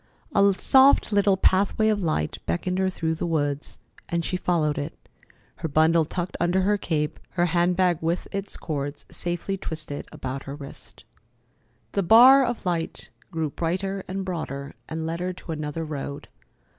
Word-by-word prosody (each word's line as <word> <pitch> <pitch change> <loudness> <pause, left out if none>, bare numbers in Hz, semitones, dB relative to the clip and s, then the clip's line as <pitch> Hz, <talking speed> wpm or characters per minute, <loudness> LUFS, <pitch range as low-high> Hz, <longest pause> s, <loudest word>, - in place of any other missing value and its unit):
A 200 0 +5
soft 265 +6 +5
little 200 -1 +3
pathway 195 +3 +3
of 210 -2 +1
light 155 - -1
beckoned 180 - -1
her 190 0 +2
through 165 -3 -1
the 165 +2 -3
woods, 145 -3 -1 0.3
and 170 -1 -1
she 185 - -1
followed 165 -5 +1
it, 145 +2 -5 0.6
her - - -3
bundle 160 +2 +4
tucked 175 +3 -4
under 175 +2 +2
her 205 +2 +3
cape, 155 -5 -2
her 175 -1 +2
hand 175 +1 +2
bag 180 -3 +3
with 165 +2 -1
its 200 0 -5
cords 145 -2 -4
safely 175 +3 -3
twisted 155 -5 -6
about 130 +1 -5
her 140 - -6
wrist. 140 -2 -10 0.9
The 200 - +1
bar 245 +8 +8
of 240 -4 -3
light 170 -2 -2 0.2
grew 160 -4 -2
brighter 190 +5 -2
and 190 +1 -3
broader, 145 -6 -4 0.2
and 160 0 -3
led 165 +1 -3
her 180 +1 -2
to 175 - -9
another 155 +1 -3
road. 145 -2 -6
170 Hz, 165 wpm, -25 LUFS, 155-190 Hz, 0.9 s, bar